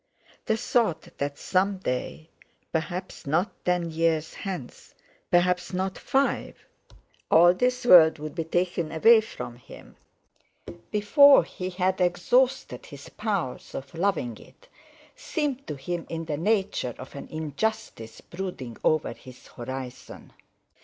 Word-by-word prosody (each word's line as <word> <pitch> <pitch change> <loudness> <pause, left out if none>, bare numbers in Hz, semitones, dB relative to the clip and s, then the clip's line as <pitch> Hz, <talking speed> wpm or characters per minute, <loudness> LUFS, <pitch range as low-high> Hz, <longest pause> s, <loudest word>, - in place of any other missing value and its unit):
The 220 - +2
thought 225 -7 0
that 140 0 -2
some 195 +1 0
day—perhaps 165 +4 -5
not 165 +7 +1
ten 180 -2 0
years 160 -1 0
hence, 180 -11 -7 0.3
perhaps 180 +1 +2
not 190 +1 -1
five—all 175 - 0
this 250 +5 0
world 165 -7 +8
would 150 0 -7
be 165 - -2
taken 175 -1 -1
away 220 +8 +6
from 120 - -8
him, 125 - -14 0.9
before 270 - +6
he 180 +2 -6
had 185 +1 -1
exhausted 180 - +1
his 140 -1 -11
powers 200 - -3
of 135 0 -7
loving 165 - -1
it, - - -19 0.5
seemed 295 - -3
to 150 - -4
him 170 +5 -5
in 165 0 -4
the 150 -2 -3
nature 190 - 0
of 130 - -10
an 140 - -8
injustice 155 - -4
brooding 170 -10 -7
over 155 -1 +1
his 130 0 -15
horizon. 130 +1 -8
175 Hz, 120 wpm, -26 LUFS, 150-200 Hz, 0.9 s, world